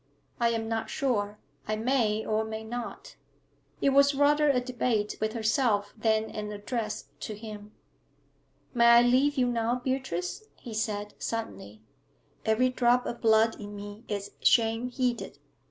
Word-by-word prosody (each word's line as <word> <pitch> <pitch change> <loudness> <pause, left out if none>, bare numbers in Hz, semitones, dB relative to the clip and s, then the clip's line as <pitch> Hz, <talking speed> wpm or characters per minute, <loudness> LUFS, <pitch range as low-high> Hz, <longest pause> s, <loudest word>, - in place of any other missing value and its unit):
I 235 -1 +3
am 225 -1 -2
not 225 0 -2
sure. 210 -7 -1 0.3
I 215 - 0
may 220 -2 +1
or 215 0 +1
may 220 0 -5
not.' 235 +1 -7 0.6
It 280 - +4
was 280 +1 +5
rather 295 +1 +4
a 265 -3 +3
debate 245 -4 -1
with 215 0 0
herself 220 -3 +1
than 220 0 +1
an 210 0 -5
address 215 +1 -4
to 215 - -5
him. 210 -1 -9 1.0
'May 235 -2 +4
I 235 0 +8
leave 265 +4 +3
you 255 - +3
now, 235 -1 0
Beatrice?' 255 - -3
he 235 - -9
said, 210 -1 -2
suddenly. 105 - -5 0.6
'Every 220 +4 +3
drop 250 0 +2
of 240 - -5
blood 225 0 +4
in 205 0 -7
me 205 +2 -9
is 200 -1 -4
shame 225 +1 +3
heated. 250 -2 -2
225 Hz, 150 wpm, -28 LUFS, 215-250 Hz, 1.0 s, I